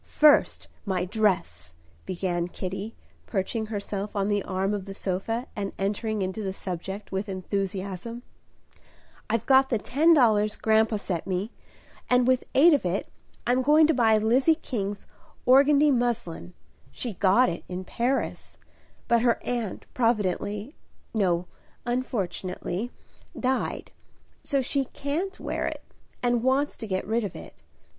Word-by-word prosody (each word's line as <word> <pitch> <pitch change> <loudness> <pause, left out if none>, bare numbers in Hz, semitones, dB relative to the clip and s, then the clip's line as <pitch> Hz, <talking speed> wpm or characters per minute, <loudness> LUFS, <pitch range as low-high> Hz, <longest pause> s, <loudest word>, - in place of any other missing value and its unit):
"First, 300 -1 +4 0.2
my 185 -3 -1
dress," 175 - -1 0.3
began 175 -1 -1
Kitty, 195 +4 -5 0.3
perching 215 +2 -2
herself 205 -1 -4
on 200 0 0
the 205 -1 +1
arm 190 +2 -1
of 200 -2 -3
the 195 -1 -7
sofa, 205 +6 -2
and 200 -2 -3
entering 210 +1 -1
into 190 +3 -3
the 190 -2 -3
subject 190 +2 -6
with 195 +2 -2
enthusiasm. 195 +4 -4 1.1
"I've 230 0 0
got 265 0 +5
the 235 - +2
ten 310 +10 +4
dollars 215 -6 +3
grandpa 220 0 +3
sent 185 -5 -3
me, 190 +4 -2 0.6
and 250 0 +4
with 255 -1 +3
eight 320 +5 +7
of 285 - +2
it 180 +2 -2 0.4
I'm 250 +2 +3
going 300 +4 +6
to 320 - +3
buy 225 -4 +4
Lizzie 250 +9 +4
King's 205 -9 -4 0.4
organdie 285 +3 +6
muslin. 235 -8 -2 0.4
She 240 -4 -4
got 195 +7 +4
it 170 - -3
in 180 0 -4
Paris; 245 +8 -2 0.5
but 235 -1 +4
her 235 -1 +3
aunt 235 -5 -3
providentially 210 - 0 0.4
no, 180 -5 +1 0.4
unfortunately 215 -4 -2 0.5
died; 260 0 -1 0.5
so 275 -2 +1
she 275 +2 0
can't 310 +10 -3
wear - - -2
it, - - -5 0.4
and 240 -1 +2
wants 265 +4 +1
to 225 - -6
get 185 -2 -2
rid 225 +2 0
of 200 - -5
it. - - -11
215 Hz, 140 wpm, -26 LUFS, 190-250 Hz, 1.1 s, eight